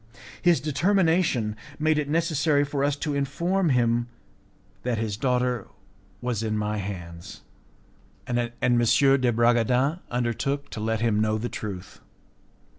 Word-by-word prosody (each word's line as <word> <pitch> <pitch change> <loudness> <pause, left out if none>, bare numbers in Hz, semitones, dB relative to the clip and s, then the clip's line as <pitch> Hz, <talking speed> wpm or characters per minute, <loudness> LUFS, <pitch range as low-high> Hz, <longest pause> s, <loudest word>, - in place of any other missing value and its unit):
His 175 -4 +4
determination 160 - +1 0.2
made 155 0 +2
it 145 -1 -3
necessary 155 -2 +2
for 140 -1 -2
us 145 0 +1
to 150 0 -3
inform 170 +6 0
him 120 -2 +2 0.7
that 120 -2 -1
his 110 -2 -2
daughter 125 -1 0 0.5
was 120 -3 -2
in 110 -1 -1
my 105 0 -1
hands, 85 -4 -7 0.8
and 120 0 -1
M. 120 -1 -1 0.3
de 130 +1 +4
Bragadin 120 +6 +2
undertook 125 +4 -2
to - - -6
let 110 +1 -1
him 110 -3 +2
know 110 0 +1
the 120 +3 -3
truth. 100 -3 -7
125 Hz, 130 wpm, -25 LUFS, 110-145 Hz, 0.8 s, His